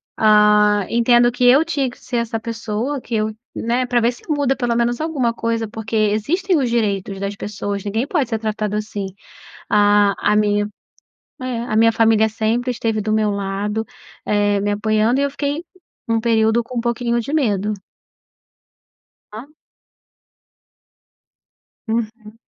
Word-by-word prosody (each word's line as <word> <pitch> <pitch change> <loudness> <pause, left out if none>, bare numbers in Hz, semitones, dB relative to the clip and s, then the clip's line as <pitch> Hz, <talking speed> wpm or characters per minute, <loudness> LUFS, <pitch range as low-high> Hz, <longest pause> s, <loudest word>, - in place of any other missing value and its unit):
ah, 210 -1 +4
entendo 240 +1 +4
que 245 +1 -3
eu 275 +6 +6
tinha 285 -6 -1
que 245 - -14
ser 245 - -4
essa 230 -1 -2
pessoa. 230 +4 -3
Que 235 - -4
eu, 215 0 -1 0.2
né, 245 +2 -1
pra 245 -1 +2
ver 235 +2 +3
se 245 - -15
muda 285 -3 +1
pelo 245 -3 -1
menos 240 +2 0
alguma 280 -7 0
coisa 230 -1 -2
porque 220 +1 -6
existem 285 - +1
os 255 - 0
direitos 200 -4 -1
das 200 +1 -3
pessoas 200 -1 -4
ninguém 220 +4 -1
pode 290 -5 -1
ser 225 - -1
tratado 215 -1 -3
assim. 210 -2 -4 0.6
A 205 -1 +4 0.2
a - - +3
minha 205 -1 +2 0.7
é, 255 -2 -3
a 225 - -4
minha 230 +1 +5
família 220 -1 +3
sempre 225 +3 -1
esteve 225 -2 -1
do 215 +1 -2
meu 215 -1 +2
lado, 200 +2 -2 0.4
eh, 205 -1 +1
me 205 - -1
apoiando 215 +4 +1
e 280 - +2
eu 280 - -1
fiquei 285 +3 -3 0.4
um 225 0 +1
período 225 0 +2
com 245 +1 -6
um - - +1
pouquinho 235 0 -1
de 235 +5 -6
medo. 210 -7 +1 1.6
Hã? 220 +5 -8 2.4
Uhum. 220 -1 -4
225 Hz, 155 wpm, -19 LUFS, 210-240 Hz, 2.4 s, eu